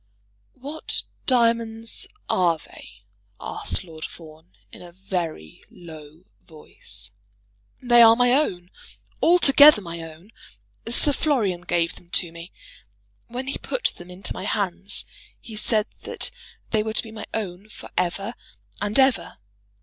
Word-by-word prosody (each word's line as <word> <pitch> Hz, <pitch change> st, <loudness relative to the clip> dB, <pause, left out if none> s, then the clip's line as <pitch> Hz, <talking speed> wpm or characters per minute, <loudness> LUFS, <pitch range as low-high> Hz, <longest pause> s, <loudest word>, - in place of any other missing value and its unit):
"What 285 Hz, +5 st, -3 dB, 0.2 s
diamonds 230 Hz, -2 st, +1 dB, 0.2 s
are 170 Hz, -3 st, +2 dB
they?" 100 Hz, -9 st, -15 dB, 0.4 s
asked -, -, -5 dB
Lord 160 Hz, -3 st, -11 dB
Fawn 155 Hz, -, -11 dB, 0.2 s
in -, -, -12 dB
a 175 Hz, -1 st, -11 dB
very 170 Hz, -, -5 dB
low 160 Hz, -1 st, -13 dB, 0.2 s
voice. 155 Hz, -9 st, -10 dB, 0.7 s
"They 240 Hz, -1 st, +6 dB
are 225 Hz, 0 st, +9 dB
my 245 Hz, +1 st, +4 dB
own, 185 Hz, -11 st, 0 dB, 0.5 s
altogether 300 Hz, -6 st, +8 dB
my 170 Hz, -3 st, -7 dB
own. 165 Hz, +5 st, -11 dB, 0.6 s
Sir 260 Hz, +5 st, +5 dB
Florian 220 Hz, -, +1 dB
gave 170 Hz, -1 st, 0 dB
them 175 Hz, -, -18 dB
to 170 Hz, -, +2 dB
me. 170 Hz, +1 st, -10 dB, 0.8 s
When 245 Hz, +2 st, -5 dB
he 270 Hz, -, -3 dB
put -, -, -1 dB
them 175 Hz, +1 st, -11 dB
into 180 Hz, +1 st, -5 dB
my 185 Hz, -, -6 dB
hands, 200 Hz, -1 st, -1 dB, 0.3 s
he 225 Hz, -, -10 dB
said 215 Hz, 0 st, +1 dB, 0.2 s
that -, -, -2 dB, 0.4 s
they 220 Hz, -, +3 dB
were 220 Hz, 0 st, -3 dB
to -, -, +1 dB
be 225 Hz, -, -10 dB
my 220 Hz, -, -8 dB
own 200 Hz, -1 st, -5 dB
for -, -, -11 dB
ever 195 Hz, +5 st, -1 dB, 0.5 s
and 205 Hz, +1 st, 0 dB
ever. 265 Hz, -2 st, +2 dB
195 Hz, 135 wpm, -24 LUFS, 170-235 Hz, 0.8 s, are